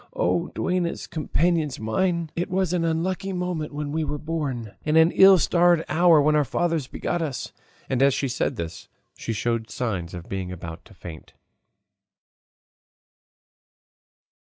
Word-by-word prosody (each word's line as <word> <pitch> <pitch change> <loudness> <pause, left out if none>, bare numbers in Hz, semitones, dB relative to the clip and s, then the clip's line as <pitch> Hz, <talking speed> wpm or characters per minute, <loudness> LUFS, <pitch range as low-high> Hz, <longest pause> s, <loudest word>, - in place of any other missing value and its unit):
Oh - - 0
duennas, 180 -2 -1
companions 155 -2 0
mine! 170 +9 -1
it 175 - -2
was 185 -1 0
an 175 -2 +1
unlucky 185 +4 -1
moment 180 -4 -3
when 145 0 -4
we 160 +1 -1
were 150 0 -3
born 140 -9 -4
and 155 +1 +2
an 160 +1 +6
ill 195 0 +7
starred 175 -1 +3
hour 170 0 +5
when 150 +1 +3
our 150 - +4
fathers 165 +1 -1
begot 175 +5 -3
us!" 145 -6 -4 0.3
And 130 -1 0
as 140 -1 +4
she 140 - -1
said 125 - -1
this 80 -1 -6 0.3
she - - -5
showed 115 +1 -2
signs 95 -9 -3
of 85 -1 -8
being 95 -2 -4
about 85 -2 -8
to - - -17
faint. 80 -3 -11
155 Hz, 150 wpm, -24 LUFS, 120-175 Hz, 0.3 s, ill